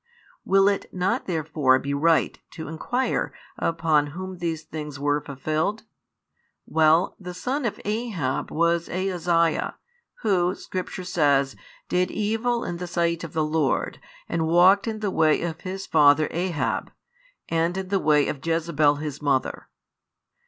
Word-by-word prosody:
Will 195 +1 +4
it 200 -1 0
not 185 +1 -1
therefore 155 -6 +2
be 140 +2 -3
right 160 +3 +2
to 160 - -7
inquire 245 - -1 0.3
upon 160 -3 +2
whom 185 -1 -6
these 165 -2 -2
things 150 -2 -7
were 145 +1 +1
fulfilled? 155 +9 -2 0.8
Well, 160 +3 +3
the 180 -2 -7
son 260 +9 -2
of 230 - -2
Ahab 210 - -2
was 170 +1 +1
Ahaziah, 175 -3 0 0.5
Who, 185 -3 +2
Scripture 185 0 -5
says, 140 -6 +2 0.3
did 180 0 +1
evil 225 +3 -1
in 175 - -4
the 180 +1 -5
sight 170 -1 0
of 165 - -7
the 160 -1 +1
Lord 150 -2 0 0.3
and 165 -1 -1
walked 185 +6 +5
in 220 -1 -3
the 205 -2 -1
way 155 -2 +3
of 165 -1 -4
his 190 0 -5
father 145 -2 +5
Ahab, 175 -2 -2 0.6
and 165 +2 0
in 190 -1 -4
the 195 -1 +2
way 150 -3 +3
of 135 -3 -4
Jezebel 165 -3 +2
his 150 -1 -5
mother. 140 -3 0
165 Hz, 145 wpm, -25 LUFS, 155-185 Hz, 0.8 s, walked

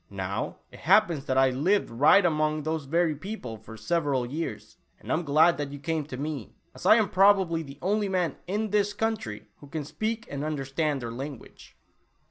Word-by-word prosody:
Now, 95 -1 -4 0.2
it - - -13
happens 155 -5 +3
that 130 - 0
I 135 0 +5
lived 175 +10 +1
right 150 +11 +5
among 155 -2 +1
those 155 -1 -2
very 165 +2 +1
people 150 - -6
for 110 +1 -12
several 140 0 0
years, 155 +7 -5 0.2
and - - -7
am 160 - +2
glad 160 +2 +4
you 145 - -7
came 155 +1 -2
to 135 -3 -7
me, 145 -5 -5 0.2
as - - -5
I - - +9
am 220 -3 +3
probably 190 -4 +4
the 140 -3 -10
only 205 +2 +1
man 180 -3 0
in 210 +2 -2
this 205 -1 +2
country 205 - -3
who 145 - -14
can 150 0 -5
speak 220 +9 -3
and 140 0 -5
understand 145 -1 -2
their 115 - -4
language." 135 +2 -9
155 Hz, 185 wpm, -27 LUFS, 135-185 Hz, 0.2 s, I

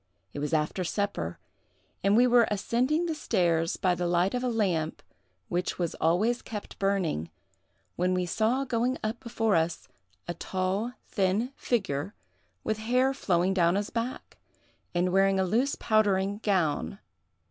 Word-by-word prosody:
It - - -5
was 150 +1 -2
after 155 +4 0
supper, 180 - -2 0.7
and 200 +2 +4
we 245 - +6
were 240 -2 +5
ascending 250 - +1
the 330 - -1
stairs 175 - +1
by 185 -1 +2
the 175 0 -1
light 175 +2 +2
of 250 0 -1
a 250 - +1
lamp 180 -9 -1 0.4
which 180 +1 -2
was 170 -3 -1
always 205 +9 +2
kept 210 -2 -8
burning, 185 - 0 0.7
when 180 +1 +1
we 180 0 0
saw 225 +9 +1
going 245 0 0
up 215 +2 -2
before 225 -4 0
us 165 +1 0 0.4
a 175 - -2
tall, 190 +7 -2
thin 200 +5 0
figure, 190 - -1 0.5
with 215 0 -1
hair 250 +4 +2
flowing 185 -5 +1
down 175 -1 +3
his 205 +1 -2
back, 235 +2 -4 0.6
and 180 +1 +1
wearing 195 0 +4
a - - +3
loose 245 +9 +1
powdering 205 -2 +1
gown. 175 - 0
195 Hz, 150 wpm, -28 LUFS, 175-230 Hz, 0.7 s, we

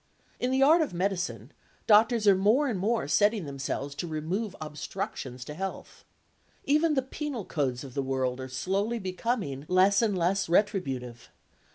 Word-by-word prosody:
In 250 - 0
the 265 +1 +3
art 320 +5 +6
of 290 - -2
medicine, 185 0 -2 0.3
doctors 220 +1 +4
are 200 - +8
more 215 +10 +3
and 220 -8 -2
more 225 +4 0
setting 205 -3 +2
themselves 140 0 -4
to 170 +4 -5
remove 180 +7 -3
obstructions 150 -5 -6
to 150 - -7
health. 190 +4 -7 0.6
Even 305 +2 +2
the 265 - +1
penal 265 - -5
codes 130 -5 -2
of 135 -3 -10
the 140 - -1
world 130 -1 -1
are 130 0 -6
slowly 195 - -1
becoming 190 - -3
less 190 +3 +4
and 210 -4 +1
less 180 +2 +1
retributive. 135 - -1
190 Hz, 160 wpm, -28 LUFS, 145-225 Hz, 0.6 s, are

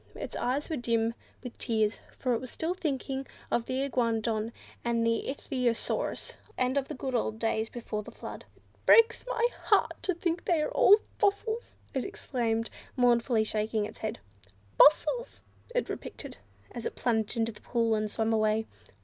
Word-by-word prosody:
Its - - -6
eyes 270 +4 0
were 320 - -2
dim 230 -1 +1 0.3
with 250 -2 -7
tears, 220 -2 +1 0.2
for 255 -2 0
it 230 - 0
was 255 - -7
still 325 +7 -2
thinking 270 -5 -3 0.2
of 235 - +1
the 260 +1 -1
Iguanodon 230 -4 0 0.3
and 235 -1 +1
ichthyosaurus, 240 0 -1 0.2
and 255 +1 +1
of 275 -1 +1
the - - -5
good 260 0 -4
old 220 -2 0
days 225 0 0
before 225 -3 -4
the - - -10
Flood. - - -8
"It - - -31
breaks 455 0 +7
my 480 -1 +2 0.2
heart - - +3
to 370 - 0
think 340 0 -1
that 355 - +3
they 320 - +2
are - - -2
all 410 - +7 0.2
fossils," 425 +3 0 0.2
it 265 -3 0
exclaimed, 235 - -1 0.2
mournfully 240 -2 +3
shaking 215 0 0
its 215 - -9
head. 220 +1 -3 0.6
"Fossils!" 480 +11 +4 0.3
it - - +1
repeated, - - -7 0.3
as 235 - -4
it - - -7
plunged 225 -1 0
into 225 0 +1
the 210 - -16
pool 230 -2 +1
and 215 -1 0
swam 225 +1 0
away. 215 0 +2
240 Hz, 170 wpm, -30 LUFS, 225-280 Hz, 0.6 s, breaks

